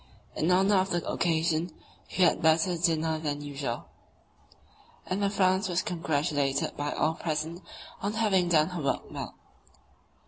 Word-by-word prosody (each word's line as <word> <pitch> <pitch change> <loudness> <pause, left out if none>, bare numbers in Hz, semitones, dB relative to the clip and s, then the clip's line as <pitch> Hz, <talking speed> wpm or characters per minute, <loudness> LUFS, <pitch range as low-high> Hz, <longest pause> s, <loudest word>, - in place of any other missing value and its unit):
In 160 - 0
honour 195 +2 +4
of 190 +1 +1
the 175 -2 -1
occasion 165 0 +1 0.4
we 185 - +1
had 175 - +4
a - - -9
better 160 +2 +3
dinner 160 -2 +1
than 145 -2 -2
usual, 140 -4 -4 1.2
and 185 +2 -2
the 200 - +2
Franz 190 -1 +2
was 175 +1 0
congratulated 150 -4 -1
by 145 0 -2
all 160 - +1
present 160 +1 -3 0.4
on 200 +2 -1
having 205 -5 +2
done 155 -1 +4
her 180 -3 -4
work 135 -2 -2
well. - - -6
165 Hz, 150 wpm, -28 LUFS, 155-185 Hz, 1.2 s, honour